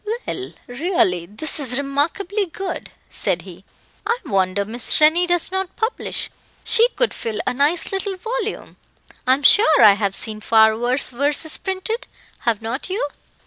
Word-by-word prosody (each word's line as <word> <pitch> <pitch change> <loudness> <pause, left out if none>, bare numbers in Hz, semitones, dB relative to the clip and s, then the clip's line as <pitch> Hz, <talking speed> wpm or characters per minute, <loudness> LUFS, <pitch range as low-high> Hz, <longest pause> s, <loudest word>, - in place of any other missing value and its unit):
"Well, 380 0 -6
really 245 - 0
this 220 - -2
is 255 -3 +1
remarkably 335 +9 -1
good," 365 +1 -6 0.2
said - - -1
he. - - -13 0.4
"I 465 - 0
wonder 195 0 0
Miss 230 +3 +1
Rennie 320 +4 +4
does 350 0 0
not 380 -1 -3
publish: 450 +2 -3 0.3
she 470 +1 +4
could - - 0
fill 220 -2 -5
a - - 0
nice 295 +6 +1
little 390 0 -2
volume. 450 +1 -5 0.5
I 260 - +6
am 285 - -9
sure 315 -1 +6
I 210 - +9
have 200 -1 -2
seen 215 -1 -2
far 220 0 +4
worse 245 +4 +2
verses 290 +5 +1
printed. 425 +6 -4 0.3
Have 230 -2 -1
not 235 +10 -4
you?" 370 -6 -2
295 Hz, 155 wpm, -20 LUFS, 230-380 Hz, 0.5 s, I